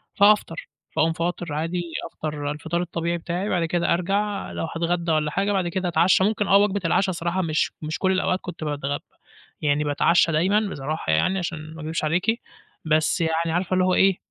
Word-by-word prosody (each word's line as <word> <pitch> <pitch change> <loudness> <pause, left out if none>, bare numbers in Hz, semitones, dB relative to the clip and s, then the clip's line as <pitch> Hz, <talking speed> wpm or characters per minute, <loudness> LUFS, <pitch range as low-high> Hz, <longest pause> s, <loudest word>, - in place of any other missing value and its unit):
فهافطر، 200 -5 +3 0.3
فاقوم 165 +1 +2
فاطر 170 -1 -3
عادي، 165 +4 -2 0.2
أفطر 150 -2 -4
الفطار 160 +3 -2
الطبيعي 170 0 -2
بتاعي، 175 +4 -3
بعد 175 -3 +1
كده 170 +1 +1
أرجع 200 +4 -1
لو - - -3
هاتغدى 170 0 0
والّا 150 -1 +1
حاجة 195 +5 0
بعد 190 -3 +1
كده 180 +1 -2
أتعشى، 175 +3 +4
ممكن 210 -1 +1
آه 195 - +6
وجبة 205 0 +2
العشا 190 +4 +2
الصراحة، 175 +1 -1
مش 160 -3 0
مش 160 +2 -4
كل 190 -1 +2
الأوقات 185 0 +1
كنت 175 -3 -7
باتغ 145 -2 -2 0.6
يعني 150 0 +1
باتعشى 165 +3 +3
دايمًا 185 +7 +3
بصراحة 140 - -3
يعني، 185 - +2
عشان 160 -3 -5
ما 160 - -9
أكدبش 160 +2 -3
عليكِ، 180 +9 +1 0.4
بس 155 +3 +2
يعني 165 0 0
عارفة 180 +2 -1
اللي 185 0 +3
هو 185 - +2
إيه، 195 0 +4
170 Hz, 185 wpm, -24 LUFS, 155-185 Hz, 0.6 s, آه